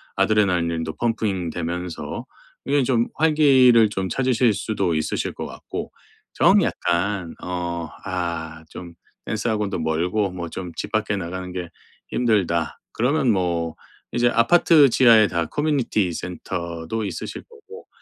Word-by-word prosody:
아드레날린도 85 -6 +1
펌핑되면서 90 -6 -3 0.4
이게 140 0 +2
좀 120 -2 +1
활기를 135 -8 +5
좀 95 -2 -3
찾으실 125 -2 +2
수도 100 -3 -1
있으실 80 - -2
것 - - -6
같고 - - -7 0.4
정 - - +5
약간 90 0 -1
어 85 -2 -3 0.2
아 85 -3 -4
좀 85 -1 -9 0.3
"댄스 110 +2 -2
학원도 105 -4 -1
멀고 90 +5 0
뭐 85 -2 -6
좀 90 -2 -6
집 105 - -5
밖에 110 -1 0
나가는 90 +1 -5
게 90 -2 -5 0.4
힘들다." 95 -9 0
그러면 125 +1 +2
뭐 85 -4 -1 0.4
이제 120 0 +3
아파트 145 +4 +5
지하에 115 -3 +6
다 85 -3 -1
커뮤니티 130 - 0
센터도 85 +3 -5
있으실 - - -6
거고 455 -1 -14
95 Hz, 265 characters per minute, -22 LUFS, 85-115 Hz, 0.4 s, 지하에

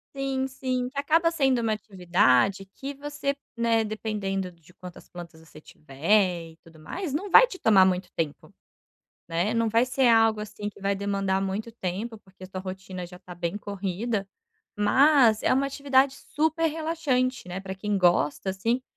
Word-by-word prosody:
Sim 270 -1 -1
sim, 255 -1 -3
que 275 - -14
acaba 325 +4 +3
sendo 270 -7 +1
uma 225 -1 +1
atividade 190 - +2
que 280 +1 -7
você, 285 0 -3 0.2
né, 230 -1 +2
dependendo 205 -3 -3
de 170 0 -22
quantas 180 -1 -12
plantas 170 -2 -11
você 160 -1 -15
tiver 170 +4 0
e - - -25
tudo 165 -1 -17
mais, 320 - -5
não 380 +8 -3
vai 475 - +8
te 430 -7 -10
tomar 195 -4 +6
muito 185 0 0
tempo, 155 -3 -4 0.8
né, 175 +7 0
não 230 0 +2
vai 230 +3 +3
ser 255 0 +2
algo 225 -2 +4
assim 210 0 -5
que 205 - -18
vai 200 0 0
demandar 195 -1 -1
muito 195 +4 -3
tempo 215 +2 -4
porque 190 -2 -17
a - - -5
sua 185 0 -7
rotina 185 -1 -7
já 180 +1 -12
está 180 -1 -11
bem 175 +2 -3
corrida, 200 +1 -3 0.5
mas 240 +1 +5
é - - +2
uma 270 +2 +2
atividade 275 -1 +2
super 315 +3 -1
relaxante, 300 - -1
né, 180 +1 -5
para 190 0 -6
quem 205 +2 -2
gosta 175 0 +2
assim 230 +7 -1
210 Hz, 175 wpm, -26 LUFS, 185-260 Hz, 0.8 s, vai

